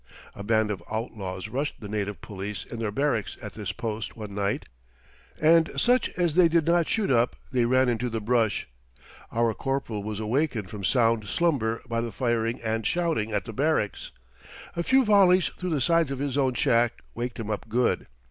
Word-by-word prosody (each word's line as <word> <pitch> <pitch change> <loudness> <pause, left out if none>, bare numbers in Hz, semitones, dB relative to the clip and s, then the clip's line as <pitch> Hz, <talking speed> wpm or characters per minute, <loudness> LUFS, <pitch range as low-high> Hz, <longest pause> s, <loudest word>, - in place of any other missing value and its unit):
A - - -9
band 110 0 +2
of 100 - -4
outlaws 105 -4 -4
rushed 140 +6 -3
the 105 - -7
native 105 -1 -3
police 100 0 -5
in 115 - -7
their 110 -2 -1
barracks 120 -1 -1
at 105 -3 -8
this 105 -3 -4
post 110 0 -5
one 105 -3 -7
night, 100 0 -1 0.7
and 160 +1 +5
such 250 +1 +3
as 175 -3 +2
they 175 +1 +6
did 165 -1 +2
not 170 -1 +3
shoot 215 -7 0
up 120 -1 +3 0.2
they 125 -3 +2
ran 130 +2 +3
into 120 +1 0
the 115 -1 -2
brush. 110 -1 +1 0.6
Our 115 -1 +1
corporal 135 -4 -2
was 105 0 -4
awakened 115 - -1
from 105 -2 -7
sound 115 0 +2
slumber 115 -7 0
by 115 0 -1
the 115 -1 -4
firing 115 -2 0
and 110 0 -1
shouting 165 -11 0
at 105 -1 -1
the 115 - -7
barracks. 140 -5 0 0.7
A 170 - 0
few 260 +8 +4
volleys 190 -4 +5
through 180 - -2
the 155 -4 0
sides 165 0 +3
of 135 - -3
his 140 -1 -2
own 130 -3 +1
shack 115 0 +2
waked 120 0 -4
him 110 -1 -3
up 105 +1 -4
good. 120 +3 +1
115 Hz, 190 wpm, -26 LUFS, 110-145 Hz, 0.7 s, they